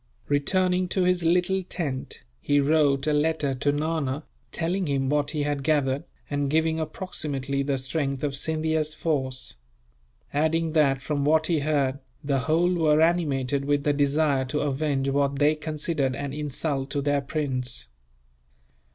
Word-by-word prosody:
Returning 180 +5 +2
to 185 +1 +1
his 180 -1 +2
little 180 +3 +2
tent, 155 -8 -5 0.2
he 145 - +2
wrote 140 -1 +3
a 155 - +2
letter 150 -2 +1
to 140 +2 0
Nana, 150 -1 -1 0.3
telling 175 +2 -1
him 135 -2 0
what 145 -1 +1
he 150 -1 -1
had 145 -1 -1
gathered, 140 -2 +1 0.2
and 145 -1 -1
giving 160 +1 +1
approximately 145 -4 -3
the 140 0 0
strength 135 0 -2
of 140 -2 -1
Scindia's 155 +1 -1
force; 130 - -3 0.8
adding 160 +2 +1
that, 135 -4 +3
from 145 0 -1
what 155 +2 +3
he 165 -1 +1
heard, 140 -2 0 0.2
the 140 -1 +1
whole 165 +6 +2
were 155 -3 +3
animated 145 -5 +1
with 145 0 +1
the 145 - +2
desire 145 -1 +2
to 145 +3 -2
avenge 140 -1 0
what 140 0 +1
they 145 +2 +4
considered 150 -3 -2
an 140 -1 -4
insult 145 -1 -2
to 140 -1 -2
their 145 0 +1
prince. 130 - -2
145 Hz, 150 wpm, -26 LUFS, 140-160 Hz, 0.8 s, they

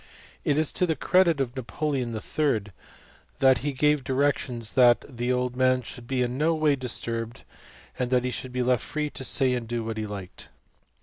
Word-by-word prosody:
It 145 - +1
is 155 -1 +2
to 180 - 0
the 160 - +1
credit 170 +1 +3
of 130 -1 -2
Napoleon 130 -1 -2
III. 115 0 0 0.7
that 130 -2 +4
he 145 - -2
gave 150 +1 +2
directions 130 -4 -1
that 120 -2 +5
the 120 -2 -3
old 125 0 -1
man 130 0 +2
should 120 +1 -9
be 130 -1 0
in 125 +2 -3
no 165 +2 +2
way 155 -2 +2
disturbed, 115 -2 -3 0.6
and 125 0 +1
should 130 - -5
be 125 0 -1
left 125 -1 +2
free 150 -1 -3
to - - -6
say 130 -1 +2
and 120 -2 -3
do 120 0 -2
what 110 0 -4
he 110 -1 -3
liked. 100 -3 -8
125 Hz, 185 wpm, -26 LUFS, 120-145 Hz, 0.7 s, that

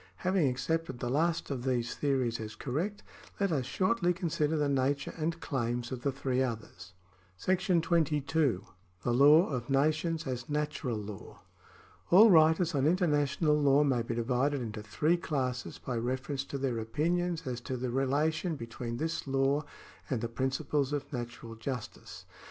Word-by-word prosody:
Having 185 -6 +3
accepted 150 +2 -2
the 120 0 -3
last 165 +3 0
of 130 -3 -3
these 125 -2 0
theories 130 -5 0
as 110 -1 -6
correct, 170 +11 -3 0.4
let 200 -2 +1
us 135 -5 0
shortly 185 -3 +1
consider 160 -3 0
the 150 -1 +1
nature 140 +1 0
and 165 +1 -2
claims 120 -4 -2
of 130 -2 -4
the 140 - 0
three 130 -1 -1
others. 110 -7 -5 0.5
§ 185 - +2
22. 150 - +1 0.4
The 120 - +1
Law 145 +7 +7
of 125 -5 -4
Nations 155 +4 +1
as 125 -1 -4
Natural 150 -5 -2
Law. 105 -1 -9 0.7
All 210 +5 +8
writers 160 +1 +5
on 140 0 +2
international 150 -3 +2
law 140 +1 +5
may 130 -4 +2
be 115 0 -3
divided 130 +4 +1
into 110 -3 -5
three 150 +11 +1
classes 130 -7 -3
by 125 -2 -4
reference 130 +3 -2
to 140 - -5
their 130 -4 -1
opinions 165 +8 -1
as 125 -2 -4
to 130 +1 -4
the 125 0 -3
relation 150 +6 0
between 115 -1 -6
this 160 0 -3
law 135 +2 +1 0.5
and 125 -5 -1
the 115 - -1
principles 135 +3 -1
of 145 0 -4
natural 120 -2 -6
justice. 120 +1 -7
140 Hz, 155 wpm, -31 LUFS, 125-160 Hz, 0.7 s, All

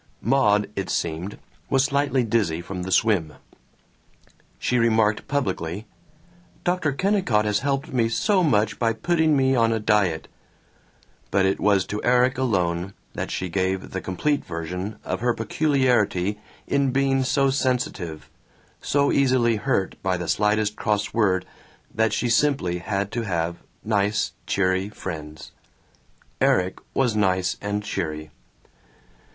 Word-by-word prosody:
Maud, 105 -4 +3
it 95 - -3
seemed, 85 +4 -2 0.3
was 135 -1 +3
slightly 140 -2 +1
dizzy 105 -8 0
from 90 +2 -6
the 95 +1 -5
swim. 95 -6 +2 1.2
She 125 - 0
remarked 110 -2 +2
publicly, 100 - -2 0.8
"Dr. 175 -4 +1
Kennicott 140 - +1
has 105 -1 +1
helped 140 +2 -2
me 115 -3 +2
so 190 - +2
much 110 -9 +1
by 115 -1 +2
putting 160 +3 +2
me 135 0 +3
on 115 -2 +3
a 115 - 0
diet," 105 -7 +1 1.0
but 95 -1 +2
it 95 - +1
was 100 -2 +3
to 105 - -4
Erik 125 +1 +3
alone 90 -6 0 0.2
that - - -4
she 95 - -3
gave 95 +1 -2
the 95 - -4
complete 145 +10 -1
version 90 +5 -5
of - - -2
her 120 0 +1
peculiarity 110 - +1 0.3
in 140 -1 +1
being 135 0 +2
so 135 +1 +2
sensitive, 125 - -2 0.5
so 140 0 +2
easily 125 -4 +3
hurt 95 -2 -1
by 95 -1 0
the 85 -1 -5
slightest 105 +2 +1
cross 105 0 -1
word, 95 -5 +2 0.5
that 110 -1 +2
she 120 - 0
simply 120 -8 +1
had 100 +3 -2
to 120 - -2
have 85 -5 -2 0.3
nice 105 -1 +1 0.2
cheery 95 0 +1
friends. 75 -6 -7 0.9
Erik 90 +1 +2 0.2
was 125 -5 +2
nice 95 -3 +1
and 105 0 -2
cheery. 75 -6 -4
105 Hz, 135 wpm, -24 LUFS, 95-130 Hz, 1.2 s, Maud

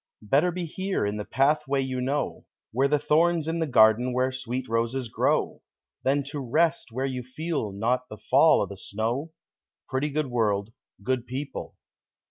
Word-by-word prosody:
Better 145 - +3
be 175 0 -3
here, 190 - -2
in 105 +1 -2
the 105 - -4
pathway 140 0 +1
you 130 -1 -2
know 140 +3 -2 0.3
Where 135 +4 +2
the 150 +1 +3
thorn's 160 +2 +2
in 165 +1 -1
the 160 - 0
garden 115 0 +5
where 130 +1 +1
sweet 130 0 -4
roses 115 +2 -1
grow, - - 0 0.4
Than 140 +2 +1
to 145 - -4
rest 145 +2 +1
where 130 +4 -2
you 130 -2 -3
feel 130 -2 -3
not 120 +6 -1
the 105 - -8
fall - - +4
o' - - +1
the 100 - -9
snow 115 - -3 0.6
Pretty 135 +2 -1
good 150 +1 -1
world, 105 -2 0 0.3
good 130 +1 -1
people! 135 +3 -5
130 Hz, 170 wpm, -26 LUFS, 115-150 Hz, 0.6 s, garden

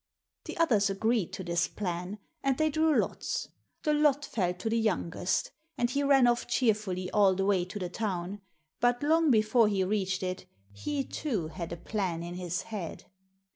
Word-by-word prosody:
The - - -6
others 225 -12 +3
agreed 220 0 0
to 190 - -5
this 170 0 +1
plan, 180 0 -4 0.2
and 270 -2 +1
they 310 0 +2
drew 315 0 +3
lots. - - -1 0.3
The 300 - +2
lot 295 -1 +3
fell 190 -9 0
to 200 - -5
the 230 +1 +2
youngest, 185 -4 0 0.3
and 240 +1 +1
he 280 - +1
ran 275 -2 +5
off 240 0 +2
cheerfully 210 -7 0
all 200 -2 +4
the 195 +1 0
way 190 -3 +2
to 185 +3 -7
the 185 -3 -3
town; 190 0 -3 0.4
but 245 +2 +2
long 320 +1 +4
before 220 -1 +4
he 200 -2 +1
reached 190 -1 -1
it, 185 0 -4 0.3
he, 275 - -2
too, 220 - -3
had 170 0 -6
a 170 - -4
plan 180 -4 -2
in 175 +1 -6
his 180 -1 -3
head. 205 -7 -6
210 Hz, 180 wpm, -30 LUFS, 185-245 Hz, 0.4 s, ran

